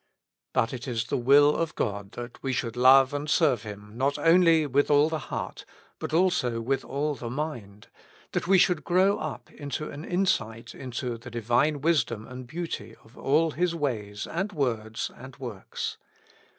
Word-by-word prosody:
But 115 +2 +1
it 125 0 -6
is 120 -3 -1
the - - -2
will 145 +4 +5
of 165 -2 -2
God 100 0 -3
that 120 0 -8
we 135 -1 -1
should 115 -2 -2
love 130 +2 +6
and 145 +1 -3
serve 145 -8 +3
Him, 105 -1 -9
not 135 +3 0
only 165 -2 +5
with 140 +1 +2
all 145 +1 +5
the 160 -1 -2
heart, - - -4 0.4
but - - -4
also 160 -9 +2
with 135 +4 -1
all 145 +2 -1
the 120 -4 -6
mind; 120 -8 -5 0.4
that - - -2
we 195 +1 +6
should 180 -3 +3
grow 185 +3 +3
up 155 -2 -6
into 145 +1 -5
an 145 +2 -8
insight 120 - -1
into 125 -2 -5
the 120 - -10
Divine 120 +6 +1
wisdom 125 -9 +1
and 125 0 -9
beauty 170 +4 -5
of 110 +3 -20
all 155 +4 +2
His 170 +2 0
ways 105 -9 -3
and 190 +5 -3
words 115 - -2
and 130 +1 -12
works. 120 -8 -5
135 Hz, 175 wpm, -27 LUFS, 115-155 Hz, 0.4 s, love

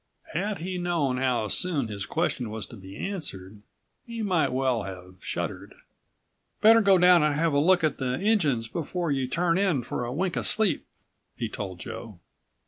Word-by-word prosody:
Had 200 +5 -1
he 180 +2 -4
known 165 -7 0
how 125 -4 +1
soon 150 - 0
his 100 -2 -5
question 140 -8 -1
was 110 -1 -4
to - - -12
be 95 0 -11
answered 105 - -5 0.4
he 230 -2 -5
might 180 -9 +2
well 130 -2 +1
have 90 -1 -9
shuddered. - - -4 0.8
"Better 225 +2 +7
go 195 -2 +5
down 180 -1 +6
and 150 -1 +2
have 160 0 +1
a 140 - +4
look 180 +3 +4
at 155 -3 +1
the 125 -1 0
engines 160 - +2
before 170 +3 -3
you 135 -2 0
turn 170 +5 +1
in 180 -11 +1
for 120 - -3
a 120 - -3
wink 175 +6 -1
of - - -1
sleep," 220 -4 +1 0.5
he 115 - -2
told 95 -4 -6
Joe. 110 -5 -8
150 Hz, 180 wpm, -27 LUFS, 115-180 Hz, 0.8 s, Better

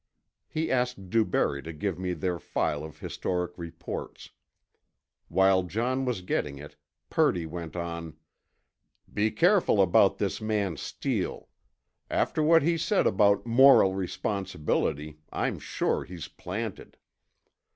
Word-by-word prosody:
He 160 +1 -2
asked 125 -7 -1
DuBarry 110 -10 +1
to 80 - -7
give 85 +3 -3
me 90 -1 -2
their 90 +1 -2
file 75 -2 -1
of 80 -3 -9
historic 90 -1 -3
reports. 85 -2 -7 1.0
While 95 +1 +4
John 120 +9 -1
was 120 -8 -2
getting 75 -5 -2
it, 75 +1 -11 0.4
Purdy 85 -2 +2
went 85 0 -7
on: 85 -2 -5 1.0
"Be 105 +1 +2
careful 170 - +3
about 95 -3 +5
this - - -2
man 105 -5 -1
Steele. - - -3 0.6
After - - 0
what 165 +1 +5
he 165 +1 +1
said 195 +5 +2
about 100 0 +3
'moral 120 -5 +6
responsibility' 80 -5 -2
I'm - - -2
sure - - -1
he's 85 -2 -8
planted." 105 +3 -6
95 Hz, 120 wpm, -28 LUFS, 85-115 Hz, 1.0 s, moral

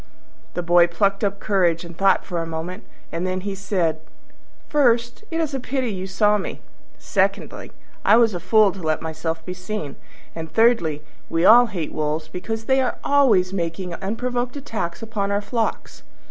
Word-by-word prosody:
The 175 - -2
Boy 175 0 +5
plucked 195 +4 0
up 200 0 -1
courage 175 -5 +1
and 170 0 -10
thought 195 +2 +3
for 175 -2 -3
a - - -3
moment, 165 +3 -6 0.3
and 170 +2 -2
then 185 0 -2
he 200 +1 -4
said, 185 -5 -1 0.7
"First, 240 - +2
it 330 - -2
is 315 -4 -1
a 270 - -1
pity 255 -1 -2
you 190 0 -5
saw 210 +2 +2
me; - - -5 0.4
secondly, - - -1 0.3
I - - +6
was 230 -3 +4
a 175 - -3
fool 215 +1 +4
to 190 - -10
let 155 -1 -1
myself 160 0 -4
be 180 - -4
seen; 185 -6 -5 0.4
and 160 -1 -7
thirdly, 170 -9 +2 0.3
we 165 +2 +1
all 240 +3 +8
hate 175 -8 -4
wolves 155 +1 -2
because 220 +7 -4
they 265 +2 +3
are 255 - -1
always 225 -11 +3
making 175 0 -3
unprovoked 245 - -3
attacks 205 -10 -4
upon 215 -3 -2
our 200 - +2
flocks." 225 +2 -3
195 Hz, 175 wpm, -22 LUFS, 170-225 Hz, 0.7 s, all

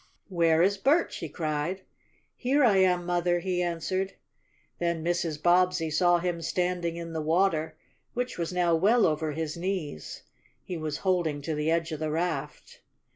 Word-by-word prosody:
"Where 165 -2 +3
is 200 +1 +2
Bert?" 295 - +2
she 165 - -5
cried. 155 +4 -2 0.5
"Here 275 +3 +2
I 215 -6 +5
am, 180 -2 +3
Mother!" 175 0 +1
he 180 0 -1
answered. 180 +3 -2 0.7
Then 170 -2 -1
Mrs. 170 -3 -1
Bobbsey 175 -1 +3
saw 175 +3 +4
him 170 -1 -2
standing 175 0 -1
in 170 -1 -6
the 160 - -2
water, 160 0 +1 0.4
which 245 +1 -2
was 170 0 -3
now 175 -2 +2
well 210 +8 +4
over 155 -1 0
his 155 0 -3
knees. 170 - -4 0.4
He 180 - -5
was 155 -2 -3
holding 175 -6 +1
to 160 - -2
the 150 +1 -1
edge 165 0 0
of 155 - -4
the 155 -1 -2
raft. 155 -2 -3
170 Hz, 165 wpm, -28 LUFS, 160-180 Hz, 0.7 s, I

